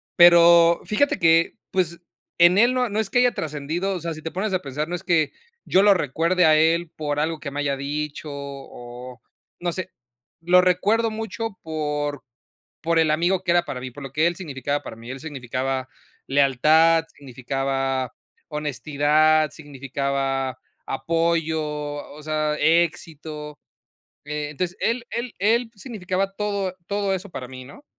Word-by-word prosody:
pero 170 -1 +7
fíjate 285 +7 +1
que, 165 0 +4 0.2
pues, 170 -2 0 0.4
en 175 +2 +6
él 240 +4 +5
no 250 -2 +1
no 210 +1 -1
es 220 - -1
que 245 - +2
haya 245 0 +4
trascendido. 160 +6 -3
O 180 - -3
sea, 165 0 -3
si 155 - -9
te 160 - -4
pones 195 +2 -2
a 185 - +2
pensar, 150 +1 -4
no 175 - -2
es 175 - -7
que, 165 -5 +2 0.4
yo 190 - +4
lo 205 -1 +7
recuerde 170 +3 +1
a 155 -1 +6
él 165 +1 +2
por 145 -1 -2
algo 160 +1 -1
que 145 - -5
me 145 - -4
haya 140 -1 0
dicho 150 +2 -4
o 130 -3 -9 0.4
no 175 0 -1
sé, 185 +1 -5 0.5
lo 180 +2 +5
recuerdo 205 +6 +2
mucho 220 -1 -5
por 150 -3 -3 0.6
por 165 0 +2
el 160 - +3
amigo 175 +4 +1
que - - -6
era 175 0 +3
para 125 - -5
mí, 130 - -5
por 140 +4 -10
lo 135 - -7
que 155 +4 +2
él 175 - -1
significaba 145 -4 -3
para 130 - -8
mí. 115 +2 -12
Él 135 - -7
significaba 130 -2 -3 0.4
lealtad, 155 +4 +4
significaba 135 -1 -2 0.4
honestidad, 150 +1 +2
significaba 135 -2 -3 0.3
apoyo, 165 +2 0 0.5
o 150 - -11
sea, 155 0 0
éxito. 155 -2 0 0.7
Entonces, 150 +4 -3
él 235 +1 0
él 235 0 -4
él 225 +4 +2
significaba 195 -3 -3
todo 200 -3 -2
todo 200 -1 0
eso 190 +2 -4
para 130 -5 -6
mí, 130 -1 -9
¿no? 145 - -14
160 Hz, 160 wpm, -23 LUFS, 140-180 Hz, 0.7 s, pero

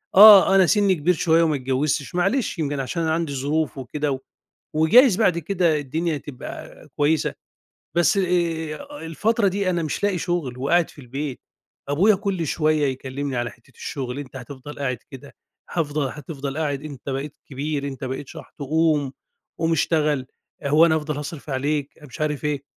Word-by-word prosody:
آه، 200 -1 +10
أنا 190 -2 +6
سِنّي 200 -1 +3
كبير 170 +4 +2
شوية 165 0 +3
وما 155 -2 +2
اتجوِّزتش 135 +4 -1
معلش 195 +1 0
يمكن 145 -2 -1
عشان 150 +6 -2
أنا 160 0 +1
عندي 165 -3 -1
ظروف 145 +2 -1
وكده 145 +3 -2
و 130 - -2 0.5
وجايز 190 - +6
بعد 180 -7 +3
كده 170 -2 +1
الدنيا 155 +3 -2
تبقى 140 -3 -9
كويسة، 150 +2 +1 0.6
بس 175 +4 +4
آآ 175 - -1
الفترة 205 +6 +1
دي 190 0 0
أنا 170 -2 0
مش 155 - -3
لاقي 195 -3 +1
شُغل 165 -9 -2
وقاعد 165 +6 +2
في 145 - -14
البيت، 135 +2 -5 0.5
أبويا 190 +10 +4
كل 190 -4 -2
شوية 155 0 +1
يكلِّمني 135 +1 -3
على 120 -1 -1
حتّة 120 +3 -21
الشُغل، 130 -2 -5
"أنت 135 -2 -8
هتفضل 130 +3 -9
قاعد 130 -4 -2
كده، 135 +1 -11 0.4
هافضل 150 -4 -1
هتفضل 145 -1 -6
قاعد، 145 -3 -1
أنت 140 -4 -9
بقيت 140 +2 -4
كبير، 140 +1 -3
أنت 135 0 -7
بقيت 130 +1 -5
شَحْط - - -12
قُوم، 150 -2 +1 0.5
قُوم 165 0 +1
اشتغل، 150 -4 +1 0.4
آآ 140 - -2
هو 155 +4 +6
أنا 160 - +3
هافضل 150 -1 -3
هاصرِف 150 0 -6
عليك." 140 +2 -1
أنا 150 - -13
مش 130 - -11
عارف 150 -1 -1
إيه. 145 -2 -1
150 Hz, 170 wpm, -23 LUFS, 140-170 Hz, 0.6 s, آه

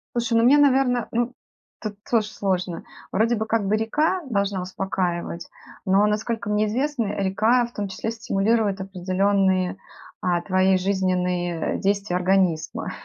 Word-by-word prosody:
Слушай, 235 -1 +1
ну 230 - +4
мне, 275 +4 +6
наверно, 265 -4 +3
ну 240 +2 -1 0.5
тут 215 -2 -5
тоже 220 -3 +2
сложно. 185 -5 -2 0.3
Вроде 230 +4 +2
бы 220 0 -2
как 220 -2 0
бы 210 - +2
река 300 +11 0
должна 200 -3 0
успокаивать, 180 -2 -3 0.4
но 195 +2 +4
насколько 215 0 -2
мне 210 +1 +2
известно, 250 +1 -1
река 220 +6 +2
в 235 - -12
том 205 -1 -3
числе 220 +3 -4
стимулирует 215 -2 0
определённые, 190 0 +1 0.5
э, - - -1 0.2
твои 185 0 +3
жизненные 180 -3 -1
действия 200 -2 0
организма. 180 -3 0
200 Hz, 140 wpm, -23 LUFS, 185-230 Hz, 0.5 s, мне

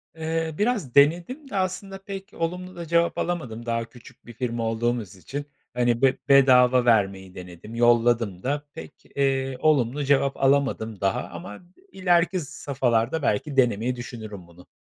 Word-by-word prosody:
Eee, 160 0 -2
biraz 210 - -1
denedim 175 - +3
de - - -7
aslında 190 +1 -2
pek 195 0 -7
olumlu 180 +2 -4
da 170 -1 -6
cevap 170 +1 +2
alamadım 120 -10 -3
daha 115 -1 -1
küçük 120 +2 -17
bir 120 - -11
firma 120 -1 -3
olduğumuz 115 -3 -2
için. 140 +10 -6 0.3
Hani, 120 -1 +1
be 135 -1 +3
bedava 130 -2 +6
vermeyi 95 -5 +1
denedim, 90 +5 -10
yolladım 120 -5 +2
da, 145 +3 -2
pek, 160 - -11
eee, 135 -1 0
olumlu 145 -2 +2
cevap 140 0 +2
alamadım 135 -7 +1
daha 95 -1 0
ama 105 - -9 0.3
ileriki 180 -1 +2
safhalarda 135 -2 -1
belki 135 +4 -1
denemeyi 125 0 +2
düşünürüm 110 -7 -8
bunu. 85 +1 -18
130 Hz, 145 wpm, -24 LUFS, 115-160 Hz, 0.3 s, bedava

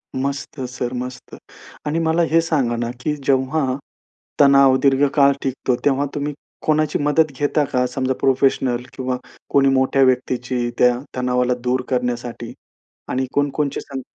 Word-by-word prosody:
मस्त 140 +2 -3
सर 125 0 -4
मस्त. 125 0 -6 0.5
आणि 150 +2 0
मला 165 +1 +1
हे 165 +1 +5
सांगा 140 -8 0
ना, 120 0 -2
की 150 +4 -1
जेव्हा, 135 +1 0 0.7
तणाव 140 -2 +6
दीर्घकाळ 140 0 +4
टिकतो 130 -1 -1
तेव्हा 140 0 +2
तुम्ही 145 0 -2 0.3
कोणाची 155 -1 +1
मदत 150 +1 +2
घेता 145 +1 +1
का? 125 0 +2
समजा 130 +1 -1
प्रोफेशनल 130 -2 +2
किंवा 130 -1 -3 0.3
कोणी 135 -1 +4
मोठ्या 130 +1 +2
व्यक्तीची 125 -1 0
त्या 125 -1 +4 0.2
तणावाला 125 0 +1
दूर 125 +1 +1
करण्यासाठी 120 -2 -3 0.5
आणि 130 +1 -1
कोण-कोणाच्या 145 0 0
संग 135 -1 -6
135 Hz, 135 wpm, -20 LUFS, 125-145 Hz, 0.7 s, तणाव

